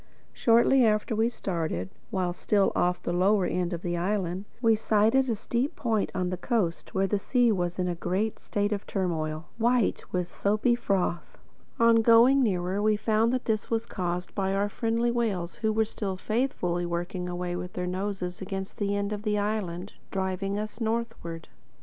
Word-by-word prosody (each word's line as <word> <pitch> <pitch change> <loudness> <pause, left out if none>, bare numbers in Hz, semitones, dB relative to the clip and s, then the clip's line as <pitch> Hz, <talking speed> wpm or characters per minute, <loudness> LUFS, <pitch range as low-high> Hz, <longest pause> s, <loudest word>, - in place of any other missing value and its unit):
Shortly 235 +3 +4
after 215 +1 +2
we 225 +2 +2
started, 160 - -3 0.2
while 180 -2 -1
still 200 +2 +2
off 180 0 +1
the 175 - -1
lower 190 +2 +3
end 175 +1 -1
of 170 -1 -4
the 175 -1 -1
island, 185 0 -1
we 225 -2 +4
sighted 225 +5 +3
a 230 - +1
steep 240 +6 -2
point 220 -4 0
on 180 -1 -1
the 180 - -2
coast 185 -5 -1
where 190 0 +3
the 200 +1 0
sea 245 +2 +3
was 175 -3 -1
in 180 -1 0
a 175 - 0
great 185 +6 -2
state 205 0 -1
of 205 -1 -3
turmoil, 160 -4 -2
white 240 -1 +2
with 180 -1 -2
soapy 215 +4 +2
froth. 190 -7 -1 0.4
On 230 0 +6
going 235 +4 +6
nearer, 190 -3 0
we 215 0 +3
found 220 +2 +2
that 255 0 -1
this 215 -2 -1
was 230 0 0
caused 180 -3 -3
by 195 -1 0
our 200 +1 +1
friendly 230 +2 0
whales 205 -8 -1
who 220 -1 0
were 220 +1 +2
still 200 -3 -4
faithfully 185 -6 -1
working 175 +1 -3
away 175 0 -3
with 180 +1 -5
their 180 - -3
noses 185 -1 -3
against 190 0 -5
the 205 -1 0
end 200 +1 -1
of 205 - -4
the 210 -1 0
island, 205 -3 -2 0.2
driving 190 +1 -2
us 215 +2 -5
northward. 225 -8 -3
200 Hz, 180 wpm, -27 LUFS, 180-225 Hz, 0.4 s, On